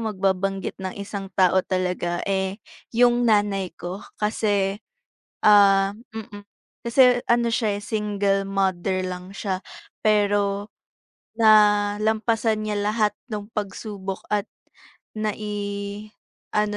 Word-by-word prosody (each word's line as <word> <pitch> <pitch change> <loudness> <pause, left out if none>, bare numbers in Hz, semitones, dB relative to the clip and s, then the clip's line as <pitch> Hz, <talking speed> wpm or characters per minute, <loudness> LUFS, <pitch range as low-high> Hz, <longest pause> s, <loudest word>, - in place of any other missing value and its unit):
magbabanggit 195 0 -1
ng 190 -1 -5
isang 200 -1 -6
tao 190 0 +4
talaga, 180 -2 -2
eh, 190 -1 -1 0.4
'yong 240 0 +4
nanay 200 -4 +1
ko, 180 +3 -6 0.2
kasi, 205 -2 0 0.6
ah 195 -2 +6 0.2
mm. 210 -2 -8 0.4
Kasi 250 +1 +5
ano 235 0 +3
siya, 215 -3 0
eh, - - -12
single 205 -2 0
mother 190 -1 0
lang 180 +1 -7
siya. 190 -2 -3 0.4
Pero 205 -1 +2 0.7
nalampasan 215 +1 +3
niya 210 -1 -2
lahat 210 0 +1 0.2
no'ng 205 -1 -4
pagsubok 200 -2 -5
at 205 -1 +1 0.7
nai-ano 210 0 -4
205 Hz, 100 wpm, -24 LUFS, 195-215 Hz, 0.7 s, ah